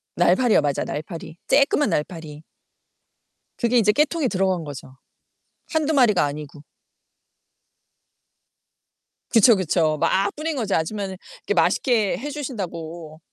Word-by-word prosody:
날파리요. 245 -10 +3
맞아 145 -2 -1
날파리, 160 +1 -7
쬐끄만 285 -1 +3
날파리. 155 -2 -4 1.2
그게 240 0 +1
이제 210 -3 +4
깨통에 300 +3 +1
들어간 190 -5 0
거죠. 135 -3 -9 0.8
1-2 315 -1 +1
마리가 235 - +4
아니고. 145 0 -6 2.7
그쵸, 230 0 +7
그쵸. 165 -4 +1
막 200 +1 +1
뿌린거지, 295 -9 -3
아줌마는 190 +3 -2 0.3
이렇게 - - 0
맛있게 205 +5 +2
해 285 +5 -6
주신다고. 170 - -6
195 Hz, 255 characters per minute, -22 LUFS, 160-245 Hz, 2.7 s, 그쵸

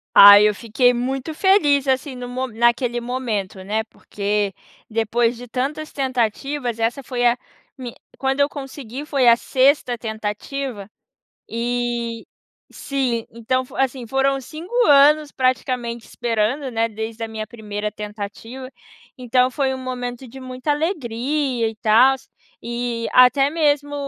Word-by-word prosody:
Ai 205 +1 +10
eu 210 - 0
fiquei 235 +3 +2
muito 260 +5 -3
feliz, 295 -8 +3
assim, 265 +1 0
no 250 0 -7
mo 255 +1 -3
naquele 235 +1 +1
momento, 230 -6 -3
né, 215 +3 -1
porque 205 -2 -3 0.4
depois 230 +1 0
de 245 - -10
tantas 275 +6 -3
tentativas 255 -1 -2
essa 235 +4 -1
foi 245 -1 -2
a 240 +1 +2 0.4
me 245 -3 -7 0.2
quando 270 +1 -1
eu 285 0 +3
consegui 270 -2 -7
foi 275 -5 +1
a 235 - +8
sexta 260 -2 +2
tentativa 220 +1 -5 0.6
e, 235 0 -2 0.5
sim, 255 -5 -2
então, 245 +3 -1
assim, 260 -2 -1
foram 270 +3 +1
5 315 - -10
anos 295 +1 +5
praticamente 250 -2 -1
esperando, 240 +4 -1
né, 230 -1 0
desde 220 +1 -5
a - - -6
minha 220 -1 -5
primeira 210 -2 -5
tentativa. 210 +5 -8 0.5
Então 255 0 +2
foi 265 0 0
um - - -6
momento 250 0 -5
de 265 +3 -11
muita 255 +2 -4
alegria, 280 - -1
e 220 - -7
tals, 260 +5 +4 0.3
e 235 -1 -3
até 265 +3 +5
mesmo 290 -2 +1
245 Hz, 135 wpm, -21 LUFS, 230-270 Hz, 0.6 s, Ai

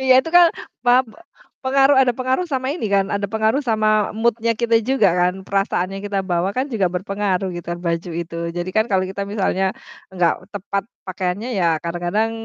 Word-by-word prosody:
Iya 260 -1 +5
itu 325 - -7
kan 350 -1 +9 0.4
pap 250 +2 +5
e - - -16 0.5
pengaruh 270 +1 +4
ada 260 -2 +4
pengaruh 255 +7 -1
sama 265 -5 -2
ini 270 - -3
kan, 195 -1 +2
ada 200 -1 -2
pengaruh 220 +7 0
sama 215 -2 +2
mood-nya 230 +1 +1
kita 230 0 +1
juga 255 -4 +3
kan. 180 +1 +2
Perasaan 195 -2 0
yang 195 - -7
kita 200 -1 -1
bawa 175 +2 +1
kan 260 +2 0
juga 200 -4 +1
berpengaruh 195 0 -1
gitu 175 - -8 0.2
baju 170 +1 -1
itu. 165 0 -7 0.2
Jadi 175 +1 -3
kan 220 - +4
kalau 190 -1 +2
kita 195 +1 -4
misalnya 200 -1 -1 0.6
gak 170 +1 +2
tepat 200 -1 -3 0.2
pakaiannya, 185 +5 -3
ya 180 - +1 0.2
kadang-kadang 175 +6 -1
205 Hz, 185 wpm, -20 LUFS, 185-245 Hz, 0.6 s, kan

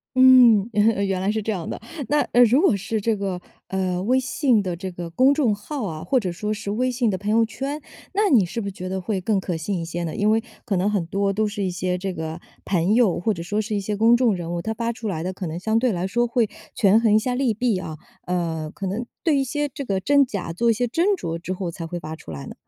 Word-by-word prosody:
嗯， 250 -5 +7
原 210 -1 +2
原 190 -1 -1
来 195 +2 +1
是 220 - -1
这 220 - -2
样 180 -6 -4
的。 - - -5 0.3
那， 295 - +2
呃， 245 +1 +7
如 245 +6 +4
果 290 - +4
是 210 +3 -3
这 225 +2 +1
个， 190 -3 -3 0.3
呃 185 -2 -1
微 255 +5 +3
信 260 -3 +2
的 185 -3 -3
这 185 +2 -6
个 175 -1 -6
公 255 +11 +4
众 265 -8 +2
号 240 +5 -5
啊， 155 -2 -6
或 265 -1 +2
者 185 -6 -3
说 210 +5 -3
是 215 -1 -6
微 250 +5 0
信 245 -2 +1
的 190 - -1
朋 205 +3 -2
友 225 +1 +4
圈， 275 +7 -5 0.3
那 410 +1 +2
你 230 - +5
是 230 +7 -4
不 200 - -5
是 - - -3
觉 185 -1 -7
得 190 0 -3
会 195 +2 -2
更 200 +2 +1
可 180 -3 -3
信 180 +4 -2
一 - - -3
些 170 +1 -4
呢？ 160 -2 -4
因 205 +1 +2
为 225 +1 +2 0.2
可 205 -6 0
能 185 +3 +1
很 200 -4 0
多 195 +2 0
都 215 +2 +1
是 205 -1 -3
一 185 - -1
些 180 +1 -2
这 190 +1 -3
个 160 0 -5 0.2
朋 185 +2 +1
友， 230 -6 +3
或 215 +5 +1
者 170 - -6
说 205 +5 -2
是 215 0 -2
一 - - 0
些 205 +1 -3
公 225 +3 +5
众 240 -4 +3
人 170 -1 -5
物， 170 - -2
他 220 - -3
发 235 +1 -2
出 225 -1 -6
来 165 -5 -3
的 185 +1 -3
可 185 -1 -5
能 160 +2 -4
相 220 +4 +1
对 250 0 +2
来 180 -2 -2
说 240 +5 +1
会 235 -1 +1 0.3
权 215 -2 +5
衡 220 -2 +4
一 - - +7
下 250 +3 -2
利 250 -1 +1
弊 220 -2 0
啊。 160 -4 -6 0.3
呃， 165 -3 -2
可 195 - -6
能 205 +6 -3 0.2
对 320 -4 +3
一 270 - +2
些 295 +3 -1
这 280 +1 -7
个 195 -6 -1
真 285 +7 +4
假 195 -7 -4
做 235 +7 +1
一 - - +5
些 245 +3 0
斟 350 - +1
酌 165 0 -4
之 180 +2 -4
后 180 -2 -4
才 165 0 -6
会 175 +1 -5
发 155 0 -6
出 160 - -14
来 70 -2 -7
呢。 - - -8
205 Hz, 305 characters per minute, -23 LUFS, 180-235 Hz, 0.3 s, 嗯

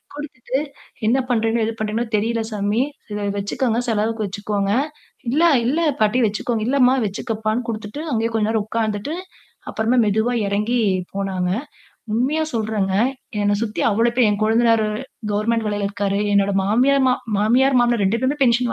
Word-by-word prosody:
குடுத்துட்டு, 265 -3 -4 0.5
"என்ன 250 +4 +3
பண்றீங்களோ, 225 -1 +1
ஏது 225 - -2
பண்றீங்கன்னு 220 +1 -2
தெரில 225 +2 0
சாமி. 210 +3 0 0.3
இத 205 0 -3
வச்சுக்கோங்க, 225 +4 -1
செலவுக்கு 220 0 0
வச்சுக்கோங்க", 200 0 -2 0.6
"இல்ல, 305 +7 +2 0.2
இல்ல 290 +7 +1 0.2
பாட்டி 215 +4 +3
வச்சுக்கோங்க", 215 +2 -2
"இல்லமா 260 -1 +4
வச்சுக்கப்பான்னு" 220 +3 -2
குடுத்துட்டு 215 +5 -5
அங்கேயே 225 0 0
கொஞ்ச 215 -1 +1
நேரம் 220 -2 0
உட்கார்ந்துட்டு 220 +6 -2 0.6
அப்புறமா 230 +3 +1
மெதுவா 220 +4 +1
இறங்கி 210 +5 0 0.3
போனாங்க. 190 -2 -1 0.6
உண்மையா 275 +8 +1
சொல்றேங்க, 210 -4 -1 0.5
என்னை 205 0 +2
சுத்தி 215 -2 -3
அவ்வளோ 230 +3 +2
பேர், 245 -3 +5
என் 205 0 -1
கொழுந்தனாரு 225 0 +3 0.4
கவர்ன்மென்ட் 220 +2 0
வேலையில 205 -1 -1
இருக்காரு. 200 0 -1
என்னோட 200 0 +3
மாமியார், 260 +7 +3
மா 250 - +4 0.2
மாமியார் 250 +5 +3
மாமனார் 240 -3 +2
2 210 +5 +1
பேருமே 275 +3 0
பென்ஷன் 240 -1 +3
225 Hz, 145 wpm, -21 LUFS, 205-240 Hz, 0.6 s, பேர்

